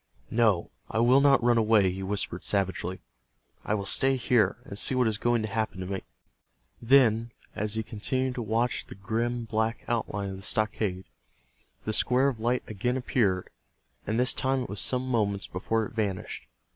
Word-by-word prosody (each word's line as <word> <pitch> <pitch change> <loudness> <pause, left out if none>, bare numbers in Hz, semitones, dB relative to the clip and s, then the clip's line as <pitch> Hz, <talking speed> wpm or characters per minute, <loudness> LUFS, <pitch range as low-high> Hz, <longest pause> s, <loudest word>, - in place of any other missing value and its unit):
"No, 110 -7 +2 0.2
I - - -3
will 125 +4 +5
not 135 -3 +4
run 120 -1 +4
away," 105 -4 +4
he 95 +1 -6
whispered, 95 -2 -2
savagely. 95 -2 -1 0.6
"I 105 - 0
will 100 -2 -3
stay 135 +6 +4
here, 115 -5 +2
and - - -8
see 130 - +3
what 125 -2 +3
is 110 -1 -1
going 120 -2 +1
to - - -2
happen 110 -3 -2
to 90 - -4
me." 95 0 -4 0.8
Then, 115 -2 +4 0.2
as 105 +1 -2
he 110 - -1
continued 130 +5 -2
to 125 - -4
watch 115 +2 -1
the - - -10
grim 115 +4 -2
black 110 +1 -1
outline 105 -4 -2
of 95 - -7
the - - -10
stockade, 105 -3 -1 0.8
the 110 - -1
square 130 +5 +3
of 120 -5 -6
light 120 +3 0
again 120 +5 -2
appeared, 105 -8 0 0.6
and 110 +3 0
this 125 +1 +4
time 130 0 0
it - - -8
was 105 - -4
some 130 0 0
moments 105 -5 0
before 110 +4 -1
it - - -10
vanished. 100 -4 -3
110 Hz, 185 wpm, -27 LUFS, 100-120 Hz, 0.8 s, will